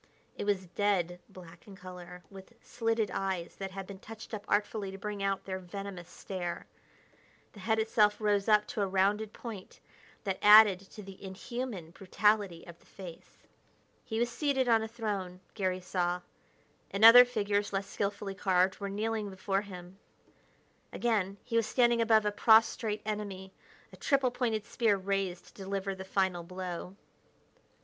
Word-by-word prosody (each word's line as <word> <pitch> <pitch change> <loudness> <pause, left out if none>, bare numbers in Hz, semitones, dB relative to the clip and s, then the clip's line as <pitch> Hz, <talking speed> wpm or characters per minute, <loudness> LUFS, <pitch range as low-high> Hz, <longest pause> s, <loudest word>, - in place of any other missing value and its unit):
It - - -4
was 195 -2 +1
dead 180 -1 0
black 175 -1 -14
in 200 - -11
color, 180 -1 -10
with 195 +3 -12
slitted 225 -3 -1
eyes 190 -3 -3
that 195 -1 -4
had 195 0 -7
been 195 0 -10
touched 220 +2 -11
up 205 -2 -4
artfully 205 -1 0
to 195 - -8
bring 205 0 -5
out 195 -1 -1
their 190 -1 -4
venomous 185 -1 -8
stare. 180 -2 -5 0.9
The 205 - -13
head 220 +3 0
itself 215 -1 +3
rose 205 -1 +1
up 210 -1 +5
to 210 - -3
a 200 - +1
rounded 200 +3 +1
point 215 -6 -9 0.4
that 195 -3 -2
added 210 -2 +8
to 200 +2 -12
the 195 0 -12
inhuman 195 -2 -6
brutality 200 -1 0
of 170 -1 -12
the - - -25
face. 180 -4 -11 0.7
He 220 - -4
was 240 +1 0
seated 270 -1 0
on 225 -2 +4
a 220 - -3
throne, 200 -5 -4
Garry 185 -2 -1
saw, 180 -1 -1 0.7
and 200 +3 +3
other 245 +2 +12
figures, 205 -4 -1
less 195 0 -1
skilfully 200 0 -3
carved, 190 -1 +1
were 200 -1 -4
kneeling 215 +1 -2
before 195 +1 -1
him. 185 -1 -11 0.9
Again, 205 -5 0
he 230 - -1
was 230 -2 +2
standing 240 -2 +3
above 220 -2 +4
a 210 - +2
prostrate 220 0 +3
enemy, 200 -3 -5 0.4
a - - -12
triple 270 -3 +2
pointed 225 -4 -1
spear 220 -3 +1
raised 190 -2 -2
to - - -18
deliver 195 0 -4
the 190 0 -8
final 190 -2 0
blow. 180 +1 -6
200 Hz, 160 wpm, -31 LUFS, 185-215 Hz, 0.9 s, other